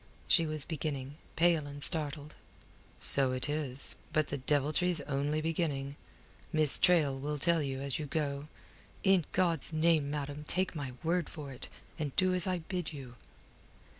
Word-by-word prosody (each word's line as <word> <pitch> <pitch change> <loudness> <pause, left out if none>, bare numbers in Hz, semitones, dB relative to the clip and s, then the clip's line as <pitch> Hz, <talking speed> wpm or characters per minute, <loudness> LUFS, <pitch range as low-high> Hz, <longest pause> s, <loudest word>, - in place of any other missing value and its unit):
she 165 -3 +4
was 155 -2 -3
beginning, 145 -3 -5 0.2
pale 165 -3 +2
and 145 0 -4
startled. 150 -1 +1 0.7
"So 135 -2 +4
it 130 +2 -1
is. 145 -3 +1 0.2
But 155 -1 0
the 140 - -3
deviltry's 150 +5 +1
only 145 +2 -2
beginning. 150 -4 -2 0.6
Miss 155 -2 +4
Traill 150 -7 +3
will 150 +1 -3
tell 170 +3 +2
you 135 -2 -4
as 140 0 -2
you 150 - -5
go. 145 -1 -3 0.6
In 190 -4 +3
God's 170 -4 +4
name, 155 -2 +2
madam, 145 0 -5
take 185 -1 +1
my 140 -4 -5
word 170 0 0
for 150 -4 -8
it, 130 - -9 0.3
and 145 -4 -4
do 185 -1 +2
as 180 0 -1
I 180 -3 -2
bid 180 -4 -3
you." 135 -5 -9
150 Hz, 160 wpm, -31 LUFS, 140-165 Hz, 0.7 s, she